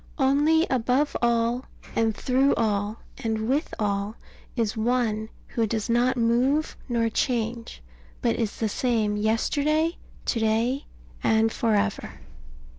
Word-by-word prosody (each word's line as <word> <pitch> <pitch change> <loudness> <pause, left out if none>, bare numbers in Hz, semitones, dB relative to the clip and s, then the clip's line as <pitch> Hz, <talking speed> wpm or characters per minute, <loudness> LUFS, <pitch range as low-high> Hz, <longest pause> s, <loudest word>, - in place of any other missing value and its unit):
Only 295 +4 +3
above 260 +3 +1
all, 235 +1 +1 0.3
and 225 -1 +2
through 265 +2 +2
all, 210 -1 -1 0.2
and 220 -1 -1
with 285 +6 0
all, 205 0 -1 0.4
is 230 -2 0
One 220 -1 0 0.2
who 230 -2 0
does 220 +1 -2
not 245 +2 +2
move 250 +6 +2
nor 230 -1 +1
change, 230 - -2 0.4
but - - +1
is 225 -3 -2
the 225 - 0
same 220 -2 0
yesterday, 290 +10 +1 0.3
to 235 - 0
day, 230 +5 +1 0.4
and 220 0 +3
for 225 -2 +1
ever. 205 0 -1
230 Hz, 125 wpm, -25 LUFS, 220-255 Hz, 0.4 s, Only